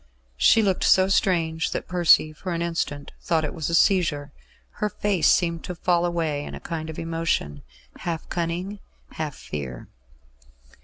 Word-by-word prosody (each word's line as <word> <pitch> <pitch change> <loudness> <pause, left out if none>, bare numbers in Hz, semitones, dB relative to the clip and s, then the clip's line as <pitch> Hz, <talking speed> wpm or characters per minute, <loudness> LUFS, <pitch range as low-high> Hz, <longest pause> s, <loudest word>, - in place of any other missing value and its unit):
She 225 - +5
looked 190 -3 +1
so 190 0 +5
strange 165 -4 +1
that - - -4
Percy 175 -3 +4
for 180 +3 -5
an 170 0 -1
instant 165 -4 -3
thought 160 -2 +1
it - - -4
was 160 -4 -3
a 170 - +1
seizure. 160 -7 +2 0.5
Her 210 - +1
face 200 -4 +2
seemed 170 -2 +1
to 180 - -5
fall 175 0 +1
away 160 -4 -1
in - - -7
a - - -8
kind 160 -1 -5
of 160 - -7
emotion, 165 - -2 0.4
half 165 -2 -4
cunning, 175 +4 -3 0.3
half 155 -3 -4
fear. 65 -5 -7
165 Hz, 160 wpm, -24 LUFS, 155-180 Hz, 0.5 s, She